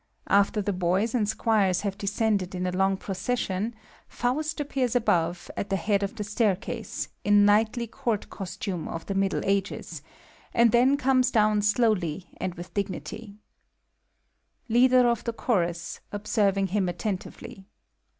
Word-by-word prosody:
After 200 +1 +3
the 205 - -1
boys 185 +5 0
and 215 -5 +1
squires 215 -5 +2
have 200 -2 -2
descended 200 -2 -1
in 180 0 -2
a 180 - 0
long 190 +1 +1
procession, 200 +2 -2 0.3
Faust 305 +6 -2
appears 270 -4 -1
above, 175 -7 +1
at 200 - -4
the 195 - +1
head 200 +3 +1
of 200 +3 -3
the 210 - -4
staircase, 205 -2 -2
in 205 0 +5
knightly 220 +3 +3
Court 225 -1 -3
costume 180 -3 -5
of 165 - -6
the 195 - -3
Middle 195 0 0
Ages, 195 +1 -2 0.5
and 235 -1 +5
then 255 +4 +4
comes 260 -2 +3
down 215 -3 +3
slowly 200 -6 +1
and 180 -2 -3
with 175 +1 -9
dignity,) 200 +1 -5 1.3
LIIADER 250 +2 +5
OF 235 -1 0
THE 235 - -2
CHORUS 175 -8 -1
(observing 200 -2 +1
him 190 -1 0
attentively). 190 +1 -5
205 Hz, 140 wpm, -26 LUFS, 190-230 Hz, 1.3 s, in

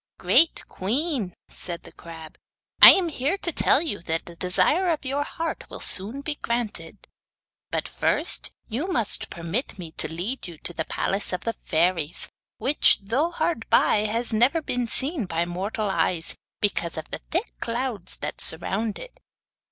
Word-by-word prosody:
'Great 330 - +3
queen,' 240 - -2 0.2
said 170 -1 -7
the - - -13
crab, 160 -2 -11 0.5
'I - - +13
am 365 -3 +1
here 295 +5 -1
to 345 - -2
tell 295 -1 +3
you 285 -11 -4
that 165 -1 -2
the 170 - -11
desire 295 - +2
of 315 -4 -2
your 275 +2 -1
heart 325 +3 -5
will - - -8
soon 215 +9 +2
be 300 +1 -3
granted. 235 -2 -4 0.6
But - - -2
first - - +3 0.2
you 255 +10 -3
must 235 - 0
permit 170 - -3
me 170 -4 -8
to - - -2
lead 185 +9 -4
you 170 -2 -10
to 175 - -7
the 160 -1 -3
palace 195 +1 -2
of 180 - -2
the 230 - -2
fairies, 165 -4 +3 0.3
which, 290 +3 +4
though 260 +11 0
hard 330 -7 -2
by, - - +4
has 230 +2 -1
never 245 +9 +3
been 245 -6 -2
seen 270 - +1
by 170 0 -1
mortal 195 +4 -3
eyes 165 -1 0 0.3
because 175 -6 0
of 160 - -7
the - - -5
thick 360 +8 -2
clouds 235 -4 -3
that - - -5
surround 200 +6 -1
it. - - -11
225 Hz, 165 wpm, -24 LUFS, 175-285 Hz, 0.6 s, I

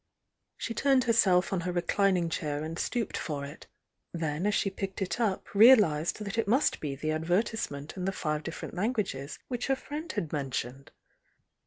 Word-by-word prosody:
She 230 - -4
turned 270 0 +3
herself 195 -6 +3
on 190 - +1
her 180 +1 -2
reclining 180 0 +2
chair 150 -2 -2
and 160 +2 -5
stooped 240 -4 -2
for 145 -3 -3
it,— 145 +2 -11 0.4
then 165 +2 -2
as 210 - +2
she 195 - +1
picked 195 0 -5
it 190 +4 -2
up 205 -5 -1
realised 210 -6 +5
that 200 +3 -3
it 220 - 0
must 255 +8 +2
be 145 -3 -3
the 155 +3 -2
advertise 175 +8 0
ment 140 +1 -8
in 180 -1 -4
the 195 - +1
five 155 -5 -2
different 160 - -7
languages 185 - -2
which 245 -2 -3
her 270 - +3
friend 300 +4 -6
had 160 - -3
mentioned. 135 -2 -3
180 Hz, 180 wpm, -29 LUFS, 155-220 Hz, 0.4 s, realised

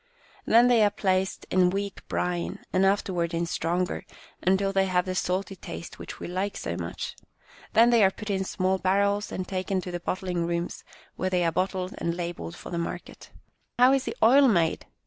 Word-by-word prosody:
Then 235 +2 +6
they 240 -3 +5
are 205 - +5
placed 190 -1 -1
in 180 -1 +4
weak 200 +1 -4
brine, 175 -1 -2 0.2
and 190 +1 +4
after 195 -1 +1
ward 170 -1 -1
in 170 +1 0
stronger, 175 +2 -1 0.4
until 190 +2 +2
they 195 0 +2
have 180 -1 +1
the 185 - -2
salty 185 +1 -1
taste 170 - -8
which - - -8
we - - -6
like 185 +3 -2
so 85 - -3
much. 85 -1 -5 0.6
Then 235 +2 +6
they 230 -3 +5
are 190 - +6
put 210 +2 -6
in 190 -1 0
small 190 0 0
barrels 200 +3 +1
and 185 -1 -4
taken 190 0 -1
to 180 - -6
the 175 - -3
bottling 180 -1 -2
rooms, 170 0 -3 0.3
where 185 - 0
they 180 -2 +1
are 165 - +2
bottled 185 +1 -1
and 170 0 -2
labelled 170 - -5
for - - -10
the 170 - -2
market." 170 - -6 0.3
" - - -47
How 250 +2 +6
is 270 -1 +1
the - - -4
oil 270 +5 +7
made 170 -8 +1
185 Hz, 205 wpm, -27 LUFS, 175-200 Hz, 0.6 s, oil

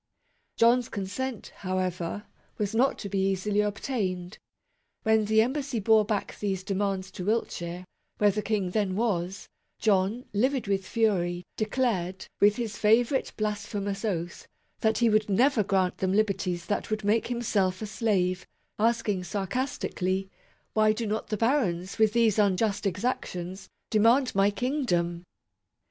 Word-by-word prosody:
John's 235 +1 +4
consent, 225 +5 -4
however, 185 0 -2 0.3
was 210 0 -2
not 250 +4 +2
to 200 - -6
be 195 0 -1
easily 200 +2 +1
obtained. 200 -4 -3 0.6
When 220 -1 +3
the 220 +1 +4
embassy 265 -1 -2
bore 215 +1 +4
back 210 -1 -3
these 190 -3 -2
de 195 - -2
mands 195 -1 -1
to 180 - -6
Wiltshire, 180 -5 -2 0.3
where 205 -1 +4
the 210 - -2
King 205 -4 -1
then 200 -2 0
was, 190 -4 -1 0.3
John, 205 +3 +1
livid 255 +5 +1
with 195 -2 -1
fury, 180 -6 0
declared, 215 -5 -1
with 205 0 +5
his 225 -3 -4
favourite 235 +5 +3
blasphe 210 -1 -3
mous 200 +1 -3
oath, 175 -5 -3 0.3
that 220 -1 +2
he 235 - +3
would 215 0 +2
never 240 +4 +3
grant 190 -2 0
them 190 0 0
liberties 190 -4 0
that 205 - -2
would 215 0 -2
make 215 +3 +2
himself 205 -6 0
a 220 - -4
slave; 195 -4 0 0.3
asking 220 -4 +1
sarcastically, 195 - -2 0.2
" - - -39
Why 215 0 +4
do 230 +1 -3
not 215 +1 -2
the 215 - -2
barons, 205 -7 0
with 215 -1 +4
these 225 -3 +3
unjust 205 +1 +2
exactions, 190 -3 -3 0.2
demand 235 +5 +4
my 195 +1 +4
Kingdom 200 - -1
205 Hz, 145 wpm, -27 LUFS, 190-225 Hz, 0.6 s, with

